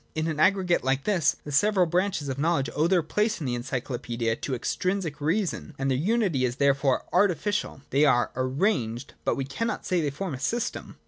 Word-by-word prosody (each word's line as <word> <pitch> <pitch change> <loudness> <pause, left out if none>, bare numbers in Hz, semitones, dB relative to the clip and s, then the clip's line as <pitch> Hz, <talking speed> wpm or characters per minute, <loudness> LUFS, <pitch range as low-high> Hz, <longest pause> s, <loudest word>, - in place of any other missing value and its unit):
In 155 0 -1
an 160 -2 -2
aggregate 185 0 +3
like 135 +1 0
this, 185 -8 +2
the 150 - -7
several 190 +5 +3
branches 180 -2 0
of 135 0 -3
knowledge 155 -3 +1
owe 155 +2 +3
their 180 -2 +3
place 210 +7 0
in 155 - -4
the 125 - -1
ency 125 +2 -2
clopaedia 120 -3 -2
to 135 - -2
extrinsic 180 +4 -2
reasons, 165 0 -1
and 135 0 0
their 130 - +1
unity 190 - +1
is 125 -1 0
there 140 +1 +4
fore 135 -1 0
artificial: 195 -4 +1
they 140 +2 +3
are 120 -5 +3
arranged, 130 - -1
but - - +1
we 135 - -2
cannot 230 - -3
say 180 -2 +1
they 150 - 0
form 165 +4 -4
a 130 - -5
system. 235 - -3
150 Hz, 205 wpm, -26 LUFS, 135-185 Hz, -, there